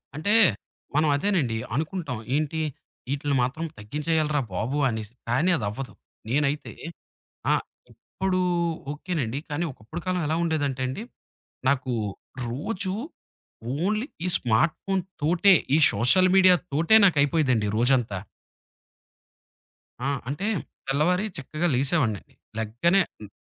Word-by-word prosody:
అంటే 200 +8 +1 0.6
మనం 155 +1 +3
అదేనండి 145 - +1 0.2
అనుకుంటాం. 155 - -2 0.2
ఏంటి, 155 +1 0 0.5
ఇటిల్ని 140 -1 0
మాత్రం 155 +6 -2
తగ్గించేయాలిరా 150 +6 0
బాబు 115 +10 -1
అనేసి. 110 -1 -5 0.2
కాని, 155 +10 +3
అది 105 - -3
అవ్వదు. 125 +5 -6 0.4
నేనైతే 145 +2 0 0.8
ఆ! - - +5 0.4
ఇప్పుడు 190 -1 -2 0.5
ఓకే 180 +5 -7
నండి. 120 +2 -2
కాని, 150 +4 -1
ఒకప్పుడు 130 +9 -8
కాలం 180 -1 0
ఎలా 160 - +1
ఉండేదంటే 145 -5 -1
అండి. 130 +11 -5 0.7
నాకు 130 -2 0 0.6
రోజు 185 - -3 0.9
ఓన్లీ, 215 +7 0 0.2
ఈ - - +1
స్మార్ట్ 125 +8 +2
ఫోనుతోటే, 185 -1 +2 0.2
ఈ - - +6 0.2
సోషల్ 185 +10 +4
మీడియా‌తోటే 180 0 +4
నాకు 180 -6 +4
అయిపోయేదండి 135 -7 +2
రోజంతా. 120 -4 +2 1.9
ఆ! - - +2 0.2
అంటే 145 +8 -3 0.4
తెల్లవారి 175 +8 +2
చక్కగా 155 +5 -2
లెగిసేవాడినండి. 130 - 0 0.3
లెగ్గానే 120 - +2 0.2
హ్మ్. 105 - -9
150 Hz, 110 wpm, -25 LUFS, 130-180 Hz, 1.9 s, ఈ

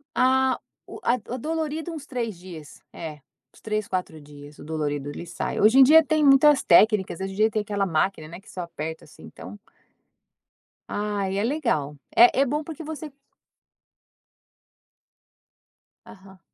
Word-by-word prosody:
A 260 0 +2 0.3
o - - -10
a 240 - +3 0.2
o - - -3
dolorido 320 +3 -3
uns 305 -3 -8
3 235 - -4
dias, 170 -5 -12
é, 160 -2 -7 0.4
uns - - -21
3, 215 -1 -3
4 180 -4 -4
dias 145 0 -14
o - - -10
dolorido, 145 -2 -3
ele 160 - -7
sai, - - -4
hoje 220 +6 +5
em 270 - +10
dia 315 +4 +7
tem 310 0 +1
muitas 275 +1 +6
técnicas, 195 -1 +4
hoje 195 0 -4
em - - -10
dia 220 +1 +3
tem 215 0 -1
aquela 205 -1 -2
máquina, 160 -1 -1
né, 170 +3 -10
que - - -19
só 180 - -6
aperta 160 -1 -7
assim 155 - -17
então 205 - -11 1.3
Ai 205 -2 -2
é 205 - 0
legal, 155 - -1 0.2
é 245 +3 +6
é 280 - +4
bom 295 +4 -2
porque 320 +1 -8
você 310 0 -7 3.0
Aham. 190 -2 -16
210 Hz, 160 wpm, -24 LUFS, 170-270 Hz, 3.0 s, em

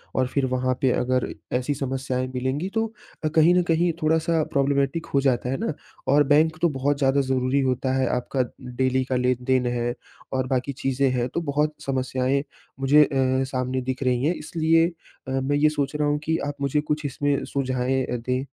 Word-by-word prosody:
और 130 -1 +2
फ़िर 135 +1 0
वहाँ 130 0 0
पे, 130 -2 +3
अगर 125 0 0 0.3
ऐसी 130 +3 -1
समस्याएँ 130 -1 -2
मिलेंगी 135 +8 -1
तो 225 0 +1 0.4
अ, - - +2
कहीं 160 +3 +4
न 180 - +4
कहीं 170 +1 +2
थोड़ा-सा 160 +1 +2
प्रॉब्लेमेटिक 140 +3 +1
हो 140 - +4
जाता 125 -2 +1
है 135 - -1
ना। 225 -9 -2 0.3
और 145 +2 +5
बैंक 160 +2 +4
तो 170 - +4
बहुत 140 +1 0
ज़्यादा 140 0 +3
ज़रूरी 130 +1 +1
होता 130 0 0
है 130 -2 +1
आपका 130 +1 -1 0.2
डेली 130 +1 0
का 130 - -2
लेन-देन 125 0 +1
है 120 0 -1 0.4
और 130 -1 0
बाकी 130 +1 -1
चीज़ें 135 0 0
हैं। 125 -1 0
तो 170 - -1
बहुत 150 0 0
समस्याएँ 130 +1 0 0.4
मुझे 145 +3 +6
अ, 130 -2 +1
सामने 130 0 -2
दिख 130 +1 -3
रही 125 0 +1
हैं। 165 - +2
इसलिए 165 +1 +2 0.4
अ, - - -4
मैं 135 +2 0
ये 150 +1 +4
सोच 145 -1 -2
रहा 150 0 +1
हूँ 145 - +1
कि 160 +1 0
आप 145 - -2
मुझे 140 +2 +1
कुछ 150 0 -2
इसमें 145 +1 0
सुझाएँ 130 -1 -1
अ, 125 - -3
दें। 125 +3 -2
135 Hz, 195 wpm, -24 LUFS, 130-150 Hz, 0.4 s, मुझे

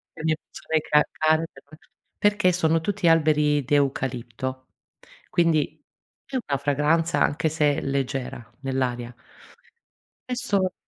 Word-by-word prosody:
le 160 - -8
mie 160 -1 +2
persone 160 -1 -3
ca 150 0 +4
care 155 +1 +2 0.7
perché 205 -3 +3
sono 165 -2 +2
tutti 200 -1 -1
alberi 150 -3 +3
di 145 - +2
eucalipto. 130 -2 -2 0.6
Quindi 165 -3 +1 0.4
è 275 - -8
una 140 -1 +1
fragranza 150 +4 +1
anche 155 +2 +2
se 150 -2 +1
leggera 135 -3 -3 0.2
nell'aria 125 -3 -2 1.2
Questo 200 -7 0
150 Hz, 110 wpm, -24 LUFS, 135-165 Hz, 1.2 s, ca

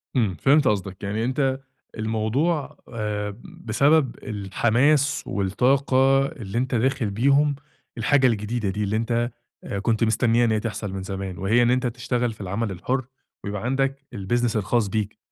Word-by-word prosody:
امم، 110 -7 +2
فهمت 145 0 +4
قصدك. 100 -1 -1
يعني 105 +3 -1
أنت 130 +1 0 0.4
الموضوع، 115 +9 -1 0.2
آآ 105 -2 -3
بسبب 140 +4 +1
الحماس 120 +8 +1
والطاقة 130 +6 +2
اللي 120 -8 -6
أنت 130 0 0
داخل 125 -1 +1
بيهم 140 +7 +3 0.4
الحاجة 130 +3 +3
الجديدة 110 -1 -1
دي، 105 +2 -2
اللي 100 +2 -1
أنت 115 +2 0 0.5
كنت 115 +1 +1
مستنيها 115 +1 +3
إن 115 - +1
هي 110 - +2
تحصل 105 -2 -4
من 95 -1 -4
زمان، 95 -2 -5
وهي 110 +6 +2
إن 120 - +3
أنت 125 0 +1
تشتغل 120 0 -2
في 105 - -13
العمل 100 +3 -2
الحر 125 +8 -2 0.4
ويبقى 100 +1 -4
عندك 135 +1 -1
الbusiness 115 +4 0
الخاص 105 +1 +1
بيك. 105 +1 -2
115 Hz, 150 wpm, -24 LUFS, 105-130 Hz, 0.5 s, فهمت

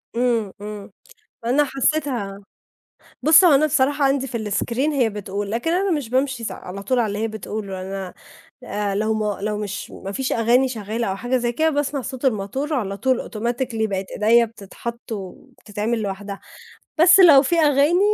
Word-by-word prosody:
امم، 235 -4 +1
امم، 210 -1 -8 0.5
أنا 265 +5 +3
حسيتها، 270 -7 -1 0.8
بُصّ، 315 +6 +7
هو 335 -5 +7
أنا 290 +3 +4
بصراحة 285 0 +2
عندي 270 0 +1
في 225 -4 -4
الscreen 250 +8 0
هي 245 -5 +2
بتقول، 200 0 -5
لكن 235 +9 -1
أنا 380 +3 +1
مش 295 -8 -1
بامشي 260 -1 0
س - - -3
على 195 +2 -8
طول 250 +6 0
على 235 - +2
اللي 205 0 -3
هي 225 +1 -1
بتقوله، 210 -2 -6
أنا، 190 -1 -6 0.5
آآ، 205 0 -2
لو 215 +2 0
ما 210 -2 -2
لو 210 0 -1
مش 205 -1 -5
ما 195 - -7
فيش 260 +5 -2
أغاني 240 +3 +3
شغالة 225 -1 -3
أو 190 - -2
حاجة 245 +5 -1
زي 240 -1 0
كده، 315 +6 +2
باسمع 290 -1 -1
صوت 260 +1 -7
الموتور 265 +6 -1
على 200 -7 -2
طول 260 +4 -1
automatically 235 0 -2
بقت 195 -1 -3
إيديّا 230 +3 +4
بتتحط 230 +2 -8
وبتتعمل 210 +3 -5
لوحدها، 200 0 -5 0.6
بس 360 +4 +7
لو 305 -7 +8
فيه 335 +5 +1
أغاني 295 +3 +4
235 Hz, 175 wpm, -22 LUFS, 205-270 Hz, 0.8 s, لو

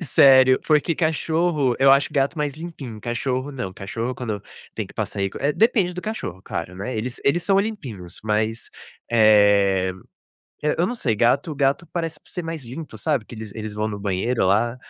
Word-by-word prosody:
Sério, 130 -2 +6
porque 155 +2 +3
cachorro 160 -4 +1
eu 135 0 +6
acho 140 +1 +4
gato 140 +3 0
mais 145 -2 -1
limpinho, 155 -8 -8
cachorro 130 +4 -2
não, 125 -8 -5
cachorro 115 +5 -4
quando 110 -5 -4 0.3
tem - - -3
que - - -16
passar - - -4
aí 100 - +1
é, 145 +2 +1
depende 210 - +2
do 180 - -4
cachorro 215 - -5
claro, 90 - -5
né, 110 +5 -4
eles 120 +3 -4
eles 165 +5 +2
são 195 +1 +3
limpinhos, 125 - -6
mas, 110 +2 -1 0.4
eh 100 -4 +4 0.7
eh, 150 - +1
eu 175 - +3
não 245 - -2
sei, 125 - -1
gato 135 +8 +2
gato 140 +4 +1
parece 165 -3 -3
por - - -17
ser 180 - -4
mais 165 -4 -5
limpo, 135 +7 -8
sabe, 145 -8 0
que 120 - -11
eles 110 -2 -8
eles 110 -1 -6
vão 105 +1 -1
no 105 -2 -5
banheiro 100 +3 0
lá, 115 +6 +2
130 Hz, 190 wpm, -23 LUFS, 110-155 Hz, 0.7 s, Sério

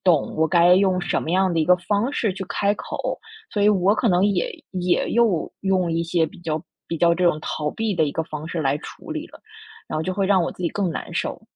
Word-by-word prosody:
懂 170 -6 +2
我 160 0 +2
该 175 +1 +6
用 190 -1 +3
什 175 - -1
么 - - -4
样 190 0 +2
的 165 - 0
一 - - +2
个 180 - +6
方 205 +7 0
式 225 -8 0
去 195 +1 -6
开 200 0 +1
口， - - -4 0.3
所 205 - 0
以 210 - +5
我 195 0 +3
可 225 +2 +1
能 180 0 +3
也 200 -4 +1 0.2
也 180 -2 0
又 225 -8 +2
用 185 -3 +1
一 165 +1 0
些 170 0 +1
比 190 +4 -8
较 160 -2 -3 0.2
比 165 - -3
较 170 +1 +4
这 180 +1 0
种 155 - 0
逃 150 -1 -2
避 220 +2 -2
的 160 - +2
一 145 - -2
个 160 - -1
方 155 -1 -7
式 165 -1 -2
来 140 +1 +1
处 - - -11
理 - - -4
了， - - -16 0.5
然 - - -2
后 - - -1
就 185 +3 -2
会 195 0 0
让 190 -2 +4
我 170 - -1
自 180 - -9
己 170 - +1
更 200 -3 -1
难 - - -6
受。 - - -3
180 Hz, 280 characters per minute, -23 LUFS, 165-195 Hz, 0.5 s, 该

